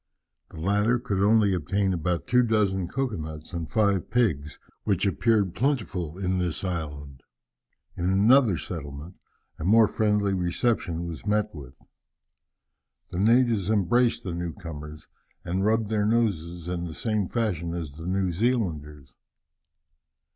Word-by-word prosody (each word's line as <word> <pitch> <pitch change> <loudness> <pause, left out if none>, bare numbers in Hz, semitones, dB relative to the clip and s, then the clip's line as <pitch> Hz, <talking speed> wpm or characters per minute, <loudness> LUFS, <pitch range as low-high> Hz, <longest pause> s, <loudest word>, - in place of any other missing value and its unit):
The - - -11
latter 105 +7 +2
could 110 -6 -2
only 105 -1 +4
obtain 95 +3 0
about 85 0 -1
two 125 +1 +4
dozen 105 -6 +1
cocoa 130 -1 -2
nuts 80 +2 -8
and 85 -2 -4
five 100 -4 +1
pigs, 80 - 0 0.3
which 100 -1 +1
appeared 100 -2 +2
plentiful 100 - -1
in 95 -1 -1
this 90 -1 -1
island. 75 -7 -5 0.7
In 85 - -3
another 105 +2 +4
settlement 75 -2 -7 0.5
a - - -5
more 110 +5 +5
friendly 105 -2 +1
reception 90 -1 -1
was 85 +4 -7
met 105 0 +1
with. 70 -4 -10 1.4
The 90 - -3
natives 115 -2 +3
embraced 110 +4 +2
the 90 - -4
new 85 -1 -4
comers, 75 -2 -9 0.4
and 95 +3 -1
rubbed 110 0 +1
their 105 -1 +1
noses 90 -7 0
in 90 -1 -3
the 80 -2 -7
same 110 -4 -1
fashion 85 -8 -2
as 80 -4 -5
the 80 +3 -8
New 95 0 0
Zealanders. 80 - -2
95 Hz, 140 wpm, -26 LUFS, 85-110 Hz, 1.4 s, more